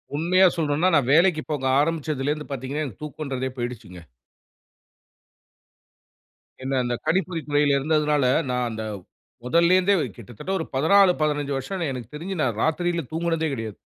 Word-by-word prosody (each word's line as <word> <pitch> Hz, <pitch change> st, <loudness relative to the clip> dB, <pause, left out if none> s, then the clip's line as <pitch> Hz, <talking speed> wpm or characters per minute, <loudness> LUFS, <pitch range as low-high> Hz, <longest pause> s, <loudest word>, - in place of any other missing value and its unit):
உண்மையா 180 Hz, +5 st, +4 dB
சொல்லணுன்னா, 155 Hz, +2 st, +1 dB
நான் 135 Hz, -4 st, +2 dB
வேலைக்கு 165 Hz, 0 st, +4 dB
போக 145 Hz, -3 st, -2 dB, 0.2 s
ஆரம்பிச்சதுலருந்து 150 Hz, -1 st, -1 dB
பாத்தீங்கன்னா, 135 Hz, +3 st, -3 dB
எனக்கு 115 Hz, -9 st, -10 dB
தூக்கன்றதே 135 Hz, -3 st, -4 dB
போய்டுச்சுங்க. 120 Hz, -8 st, -6 dB, 2.6 s
என்ன 135 Hz, +1 st, -2 dB
அந்த 120 Hz, 0 st, -1 dB
கணிப்பொறி 170 Hz, 0 st, 0 dB
துறைல 145 Hz, -1 st, +3 dB
இருந்ததுனால, 150 Hz, -1 st, +1 dB, 0.3 s
நான் 125 Hz, -1 st, 0 dB
அந்த 110 Hz, 0 st, -5 dB, 0.6 s
மொதல்லேருந்தே, 180 Hz, +7 st, +4 dB, 0.2 s
கிட்டத்தட்ட 120 Hz, -, -8 dB
1 160 Hz, -, -3 dB
14 190 Hz, +7 st, +5 dB
15, 145 Hz, -2 st, 0 dB
வருஷம் 165 Hz, +4 st, -3 dB
எனக்கு 125 Hz, -1 st, -8 dB
தெரிஞ்சு 180 Hz, +4 st, -5 dB
நான் 120 Hz, -5 st, -1 dB
ராத்திரியில 170 Hz, +1 st, 0 dB
தூங்குனதே 165 Hz, -1 st, -1 dB
கிடையாது. 110 Hz, -5 st, -5 dB
150 Hz, 125 wpm, -24 LUFS, 130-165 Hz, 2.6 s, 14